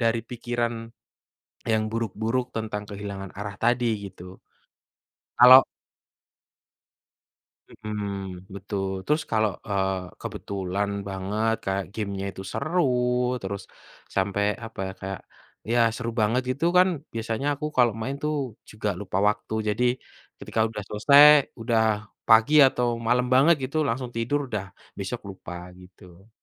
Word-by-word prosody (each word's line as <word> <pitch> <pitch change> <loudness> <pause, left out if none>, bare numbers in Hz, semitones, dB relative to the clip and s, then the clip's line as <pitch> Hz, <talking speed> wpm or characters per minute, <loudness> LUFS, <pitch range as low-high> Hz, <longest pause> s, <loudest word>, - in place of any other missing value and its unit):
dari 115 0 +2
pikiran 120 -1 -3 0.8
yang 110 -1 +1
buruk-buruk 115 +3 -2
tentang 110 -2 -3
kehilangan 100 -2 -6
arah 100 -1 -5
tadi 120 +1 +2 0.2
gitu, 90 0 -12 1.0
kalau 130 +2 +10 2.0
Mhm, 100 -3 -6
betul. 100 0 -3 0.2
Terus 150 +2 +1
kalau, 110 -1 +2 0.2
eee, 95 -1 0 0.2
kebetulan 100 +1 -3 0.2
banget 105 +4 -1
kayak 95 0 -1
game-nya 100 -3 -4
itu 95 - -8
seru 165 +6 0 0.6
terus 100 0 -4 0.5
sampai 100 +1 +1 0.2
apa 115 0 -11
ya, - - -6
kayak, 95 0 -5 0.5
ya 120 - +3 0.2
seru 115 -2 -3
banget 110 +4 +2
gitu 140 +5 -2
kan 180 +1 +7 0.2
biasanya 115 +4 -3
aku 145 +2 -4
kalau 120 -2 +5
main 135 +5 -3
tuh 150 0 0 0.4
juga 105 -1 -3
lupa 95 -2 -2
waktu. 105 +1 -2
Jadi, 110 +4 +1 0.6
ketika 110 - -2
udah 105 -2 -6
selesai, 140 +8 +6 0.4
udah 115 -1 +2 0.5
pagi 115 +6 +6
atau 125 -1 -1 0.2
malam 125 +2 +2
banget 145 +6 +6
gitu 135 +4 -5
langsung 125 0 -2
tidur 115 +5 0
udah 105 -4 -3 0.3
besok 100 +5 -4
lupa 95 -3 -9 0.3
gitu. 90 +1 -17
110 Hz, 125 wpm, -25 LUFS, 100-120 Hz, 2.0 s, kalau